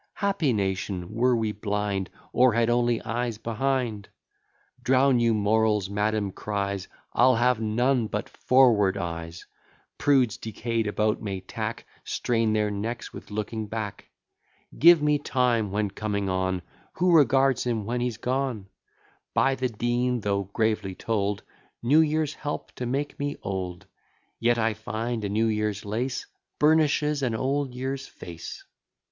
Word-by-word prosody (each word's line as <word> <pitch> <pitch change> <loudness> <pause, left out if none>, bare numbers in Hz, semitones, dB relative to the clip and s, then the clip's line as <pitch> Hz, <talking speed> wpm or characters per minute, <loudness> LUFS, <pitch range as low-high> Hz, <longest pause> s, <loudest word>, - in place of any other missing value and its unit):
Happy 195 -9 +1
nation, 95 -3 -2
were 125 +2 +3
we 110 -2 0
blind, 105 -2 -2 0.2
Or 125 -1 +5
had 115 +1 +2
only 120 -1 +2
eyes 120 -1 -2
behind! 115 -2 -2 0.7
Drown 130 0 +4
your 115 -1 +3
morals, 105 -1 +2
madam 105 0 0
cries, 100 -1 -3 0.3
I'll 130 0 +5
have 120 0 +2
none 120 +2 +1
but - - -3
forward 115 -7 +3
eyes; 85 -2 -5 0.5
Prudes 130 -6 +3
decay'd 115 +1 -2
about 105 +1 0
may 100 -3 -3
tack, 95 - -5 0.2
Strain 115 -2 0
their 105 -1 +1
necks 115 +4 -4
with - - -10
looking 110 +1 -3
back. 105 -2 -5 0.7
Give 170 -1 +7
me 150 -1 +3
time 120 -6 +1
when 105 0 -1
coming 100 -1 -2
on; 95 -1 -1 0.3
Who 175 0 +3
regards 135 -3 +4
him 110 -4 -1
when 120 +3 -2
he's 120 -3 -1
gone? 125 -5 -2 0.7
By 135 - +4
the 130 -1 -1
Dean 120 +2 0
though 100 -1 0
gravely 105 -1 -1
told, 105 -2 -1 0.4
New 140 +7 +5
years 155 -1 +1
help 145 -1 -5
to 125 - -5
make 140 +4 -2
me 145 0 -2
old; 90 -2 -4 0.5
Yet 120 0 +3
I 115 -1 +1
find 110 +2 -4
a 100 - -1
new 110 +3 +1
year's 105 -2 -1
lace 120 +6 -2 0.3
Burnishes 150 -1 +3
an 120 -4 0
old 135 +2 -1
year's 135 +1 -4
face. 85 -1 -9
115 Hz, 140 wpm, -26 LUFS, 105-125 Hz, 0.7 s, Give